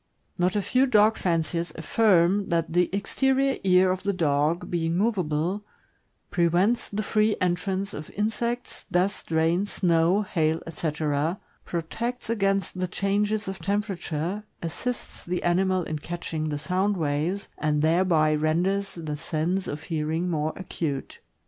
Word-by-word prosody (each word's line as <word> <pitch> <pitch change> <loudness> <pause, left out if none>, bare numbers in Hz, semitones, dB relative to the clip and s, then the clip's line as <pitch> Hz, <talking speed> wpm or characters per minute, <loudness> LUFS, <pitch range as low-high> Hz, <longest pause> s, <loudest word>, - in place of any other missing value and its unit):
Not 180 +2 +1
a 205 - +1
few 255 +7 +3
dog 215 -2 +5
fanciers 170 -1 -1
affirm 195 +1 +3
that 165 -1 0
the 175 0 +3
exterior 265 +7 +1
ear 185 -1 +5
of 185 0 -2
the 200 - 0
dog, 155 -1 +1
being 165 -1 0
movable, 185 -2 0 0.7
prevents 175 +7 +2
the 210 +1 -2
free 215 +1 +2
entrance 190 +2 -1
of 150 - -7
insects, 235 +3 -2
dust, 185 +3 0
rain, 165 +4 +2
snow, 175 +2 +2
hail, 160 -4 0
etc., 155 +1 -1 0.3
protects 230 +9 -3
against 195 -3 0
the 185 - 0
changes 205 +3 0
of 190 0 -4
temperature, 195 -1 -2 0.2
assists 240 +9 -4
the 180 0 -3
animal 185 +1 +2
in 155 -2 -4
catching 160 -1 -4
the 145 - -2
sound 190 +6 0
waves, 160 +5 -1
and 150 -1 +1
thereby 160 -2 +3
renders 180 +6 0
the 155 -3 -4
sense, 165 +4 -1
of 145 +1 -5
hearing 160 +2 -1
more 155 -1 0
acute. 155 -7 -4
180 Hz, 135 wpm, -26 LUFS, 160-200 Hz, 0.7 s, dog